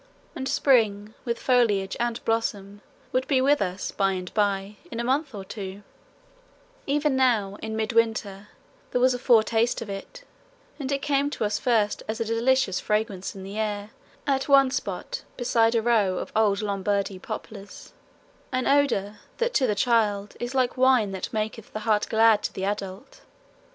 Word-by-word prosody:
And 265 -3 -3
spring 215 -5 +2
with 235 -1 -1
foliage 215 -7 +2
and 235 0 -2
blossom 205 -3 -2 0.3
would 260 +1 0
be 270 -3 +3
with 280 +3 +3
us 185 0 -2
by 195 -1 +1
and 180 -1 -6
by, 200 -1 0
in 230 - -5
a - - -1
month 270 +1 0
or 195 -1 -7
two; 200 0 -7 1.0
even 295 0 +1
now 225 -7 +2
in 220 0 -4
midwinter 220 -3 0 0.4
there 250 - 0
was 255 +1 +4
a 245 - -4
foretaste 230 -1 +3
of 215 -3 -6
it, 200 - -8 0.6
and 275 -1 -3
it 275 -1 -1
came 285 0 +1
to 290 - -4
us 205 0 -1
first 220 -4 +1
as 220 +2 -3
a 230 - -1
delicious 230 -2 +1
fragrance 210 -3 -2
in 190 - -8
the 200 +3 -6
air 210 -1 -3 0.3
at 270 0 0
one 275 -2 +6
spot 380 - -4 0.2
beside 230 -2 +2
a 225 - +2
row 210 -6 +2
of - - -5
old 215 -2 +2
Lombardy 200 -1 -1
poplars 200 +1 -9 0.6
an 255 -1 -1
odour 235 -8 +1 0.2
that 480 +1 0
to 265 - +3
the 210 - 0
child 210 -2 +1
is 240 +2 -4
like 255 -1 +1
wine 255 -5 +4
that 190 -1 -5
maketh 220 0 -4
the 215 - -4
heart 215 -1 +1
glad 220 -1 +5
to - - -3
the 190 - -4
adult. 200 +4 -5
220 Hz, 170 wpm, -25 LUFS, 205-255 Hz, 1.0 s, one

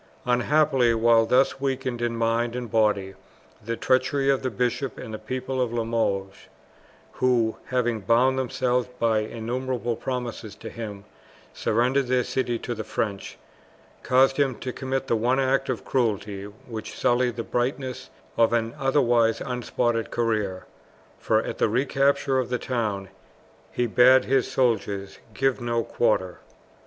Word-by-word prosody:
Unhappily, 125 -1 +3
while 115 0 +4
thus 130 +2 +2
weakened 130 -3 -2
in 120 -1 -1
mind 115 +1 0
and 125 -3 -5
body 105 -4 +1 0.5
the 115 +1 -3
treachery 135 +2 +2
of 135 - 0
the 130 - -1
bishop 125 +3 -2
and 110 -3 -7
people 130 +1 -2
of 125 -2 0
Limoges, 110 -5 -2 0.6
who, 120 -3 +1
having 120 -3 0
bound 120 +6 +3
themselves 125 -1 0
by 115 -2 +2
innumerable 120 +2 -3
promises 120 -4 -5
to 110 0 -9
him, 105 -4 -7 0.5
surrendered 125 +4 +1
their 125 0 +2
city 120 -2 -1
to 120 - -4
the 110 -1 -5
French, 100 -3 -4 0.6
caused 135 +1 +3
him 135 -3 +2
to 125 +1 -6
commit 135 0 -3
the 115 - +1
one 125 +4 +1
act 135 0 +1
of 125 - -3
cruelty 105 -5 -1
which 110 +2 -9
sullied 120 -1 +2
the 115 - -3
brightness 130 +2 -3 0.3
of 115 0 +4
an 115 0 0
otherwise 120 -4 +3
unspotted 120 -2 -1
career, 105 -5 -1 0.5
for 110 0 +1
at - - -6
the - - +3
recapture 135 +2 +1
of 125 - -2
the 125 - 0
town 110 -6 -2 0.6
he 125 - 0
bade 125 +3 +5
his 135 -1 +1
soldiers 105 -6 -1 0.2
give 135 -1 +1
no 120 -1 0
quarter. 95 -7 0
120 Hz, 145 wpm, -25 LUFS, 115-130 Hz, 0.6 s, bade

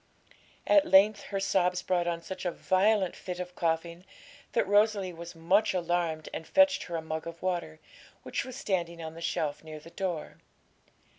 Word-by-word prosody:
At 300 -1 +5
length 200 +2 +5
her 195 - -3
sobs 180 -2 +1
brought 175 -2 0
on 170 -1 -2
such 190 +1 -7
a 180 - 0
violent 190 +1 +2
fit 180 -1 -6
of 180 0 -5
coughing 170 +1 -2 0.5
that - - +2
Rosalie 205 -2 +3
was 170 +1 -9
much 190 +6 +2
alarmed, 170 -3 -1
and 160 - -6
fetched 285 0 +4
her 170 - -5
a 160 - -3
mug 160 0 -4
of 170 0 -8
water, 170 -4 -2 0.4
which - - -2
was 255 -1 -8
standing 175 -8 -2
on 160 0 -6
the 165 - -10
shelf 150 -2 -2
near 155 -1 -8
the 165 +2 -14
door. 180 -5 -4
175 Hz, 175 wpm, -29 LUFS, 165-195 Hz, 0.5 s, At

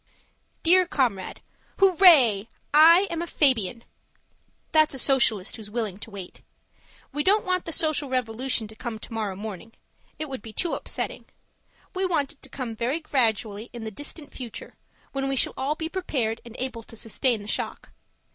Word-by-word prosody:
Dear 360 +2 +6
Comrade, 235 - -1 0.4
Hooray! 320 - +6 0.3
I'm 335 +3 +6
a 345 - -4
Fabian. 240 - +1 0.9
That's 310 -3 +4
a - - -5
Socialist 235 -8 +2
who's 215 -2 -10
willing 210 -4 -3
to 225 - -9
wait. 195 -4 -9 0.7
We 295 +1 -2
don't 410 +5 +3
want 365 -1 0
the 330 - -4
social 310 -3 +1
revolution 250 -1 -1
to 220 - -11
come 225 0 -5
tomorrow 215 -3 -4
morning; 215 +2 -8 0.4
it 310 - -4
would 265 -5 -6
be 220 0 -10
too 345 - -1
upsetting. - - -4 0.7
We 375 0 -2
want 295 -6 0
it 290 - -18
to - - -9
come 245 -5 -5
very 245 +8 -1
gradually 225 -7 0
in 235 -2 -7
the 220 - -5
distant 290 - -7
future, 245 -3 -8 0.4
when 270 0 -2
we 270 - 0
shall - - +2
all 275 +3 -1
be 320 0 -4
prepared 265 -11 -2
and 235 -1 -12
able 255 -3 -4
to 225 - -13
sustain 225 0 0
the - - -10
shock. - - -3
255 Hz, 165 wpm, -25 LUFS, 220-310 Hz, 0.9 s, Dear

